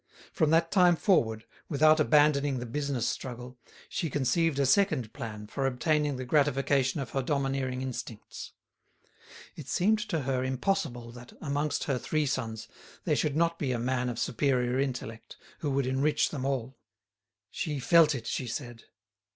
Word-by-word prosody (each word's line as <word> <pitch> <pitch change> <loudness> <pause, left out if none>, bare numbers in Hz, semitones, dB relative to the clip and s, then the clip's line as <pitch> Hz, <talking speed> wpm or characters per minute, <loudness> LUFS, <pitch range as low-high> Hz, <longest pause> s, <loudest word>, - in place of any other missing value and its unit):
From 155 - +2
that 165 +1 +3
time 180 -3 +5
forward, 120 - +1 0.2
without 155 +1 +4
abandoning 145 -2 +3
the 120 - -4
business 135 -1 -2
struggle, 125 0 -6 0.3
she 165 - -3
conceived 145 +3 +1
a 140 - +2
second 135 - +2
plan 110 -6 -6
for 135 +5 -2
obtaining 150 +2 0
the 130 0 -5
gratification 135 -1 +2
of 135 -4 -5
her 135 - 0
domineering 135 -2 -1
instincts. 120 -4 -7 1.0
It 150 - -9
seemed 210 +9 +2
to 165 -6 0
her 130 -1 -1
impossible 130 -3 -2
that, 120 0 -12
amongst 145 +1 -1
her 135 -3 -1
three 155 +3 0
sons, 115 -5 -3 0.4
there - - +1
should 150 -2 0
not 170 +1 +1
be 135 -3 -1
a - - -1
man 125 +1 -1
of 120 - -5
superior 125 0 0
intellect, 125 -4 -4 0.2
who 150 - -2
would 135 -1 0
enrich 135 +3 +1
them 135 -3 -4
all. 135 -1 -3 0.7
She 150 -4 -3
felt 155 +3 +5
it, 120 - -6
she 125 - -3
said. 120 -1 -6
135 Hz, 160 wpm, -29 LUFS, 125-150 Hz, 1.0 s, time